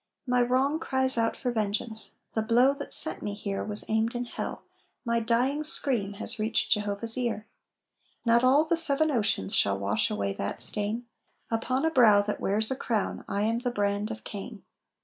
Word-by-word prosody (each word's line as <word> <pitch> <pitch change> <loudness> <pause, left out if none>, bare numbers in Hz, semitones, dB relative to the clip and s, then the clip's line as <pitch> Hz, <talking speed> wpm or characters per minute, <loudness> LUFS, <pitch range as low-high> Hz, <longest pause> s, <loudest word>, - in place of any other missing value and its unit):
"My 250 -1 +1
wrong 260 +5 +1
cries 265 -4 +1
out 230 -1 0
for 245 - -2
vengeance, 220 0 -2 0.2
The 220 - 0
blow 240 +5 +3
that 280 - -8
sent - - +7
me 205 - -4
here 200 -1 -4
Was 210 0 -1
aimed 220 +2 0
in 240 0 -3
hell. - - -6 0.4
My 235 0 +1
dying 245 +6 0
scream 240 -9 0
Has 220 +2 -5
reached 220 +1 -1
Jehovah's 210 +3 +1
ear. 225 -3 -3 0.8
Not 235 +1 +3
all 275 +5 +4
the 335 +1 +1
seven 315 -1 +3
oceans 205 - 0
Shall 100 -1 +2
wash 100 +2 0
away 100 -1 -2
that 100 - -5
stain; 210 - 0 0.5
Upon 255 +5 -1
a 320 - +1
brow 215 -7 +5
that 210 0 -4
wears 215 +4 0
a - - 0
crown 225 -5 -3
I 200 +1 -2
am 225 +2 0
the 250 0 -2
brand 205 -1 -2
of 225 -1 -8
Cain." 205 +1 -8
225 Hz, 185 wpm, -27 LUFS, 205-250 Hz, 0.8 s, sent